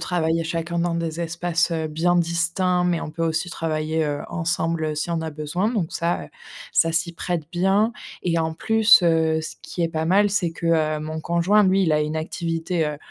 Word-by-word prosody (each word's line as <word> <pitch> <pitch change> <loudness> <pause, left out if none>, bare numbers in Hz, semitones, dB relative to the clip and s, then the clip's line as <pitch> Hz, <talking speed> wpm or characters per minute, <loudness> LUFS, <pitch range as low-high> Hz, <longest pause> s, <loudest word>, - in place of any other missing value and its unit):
travailler 165 -2 0
chacun 165 +1 -3
dans 170 0 0
des 165 0 -3
espaces, 170 +1 0
heu, 160 -1 -2
bien 170 +3 +1
distincts, 175 +2 +1
mais 175 -2 0
on - - -5
peut 165 +2 -5
aussi 165 +2 -1
travailler, 160 -1 -1
heu, 145 0 -2
ensemble 165 -2 -1
si 155 - -2
on 165 -1 -1
a 160 - -3
besoin. 155 +7 -2
Donc 200 -9 -2
ça, 170 0 -1
heu, - - -13 0.4
ça 165 - +3
s'y 170 +1 0
prête 170 -1 -3
bien 195 +6 +2 0.3
et 170 -2 +1
en 160 0 -1
plus, 220 +1 +5
heu, 160 -1 +2
ce - - -6
qui 175 - -5
est 165 - +1
pas 160 -1 -2
mal, 200 +3 +4
c'est 175 -5 0
que, 170 0 -3 0.3
heu, - - -7
mon 155 +1 -5
conjoint, 170 +6 +3
lui, 190 +1 +3
il 160 -4 +2
a 150 - +3
une 150 +1 -2
activité, 165 +1 -2
heu, 150 -1 -3
165 Hz, 210 wpm, -23 LUFS, 160-175 Hz, 0.4 s, plus